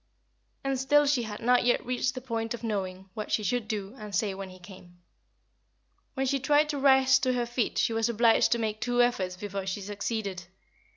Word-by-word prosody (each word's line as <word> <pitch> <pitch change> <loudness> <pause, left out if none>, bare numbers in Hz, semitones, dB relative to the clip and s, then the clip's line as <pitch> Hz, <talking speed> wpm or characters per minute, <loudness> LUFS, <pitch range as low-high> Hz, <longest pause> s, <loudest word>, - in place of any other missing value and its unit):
And 270 -1 -1
still 295 +3 +4
she 280 -3 +2
had 215 -2 -6
not 245 +1 +3
yet 245 0 +1
reached 250 +1 -1
the 255 - -5
point 230 -2 -3
of 235 - -13
knowing 190 -3 -4
what 215 +1 -6
she 215 - +1
should 225 +2 -1
do 205 -2 -4
and 210 -2 -6
say 200 0 0
when 195 0 -7
he 185 - -12
came. 180 -1 -14 1.2
When 270 -1 0
she 275 +1 +1
tried 295 +2 +3
to 290 -2 -2
rise 265 -1 +5
to 255 0 +1
her 245 -1 0
feet 240 -1 -2
she 230 - +2
was 225 +1 +1
obliged 230 0 +3
to - - 0
make 215 -2 -3
two 245 0 +3
efforts 190 -7 -1
before 195 -1 -5
she 190 +2 -3
succeeded. 200 -2 -4
225 Hz, 210 wpm, -28 LUFS, 200-250 Hz, 1.2 s, rise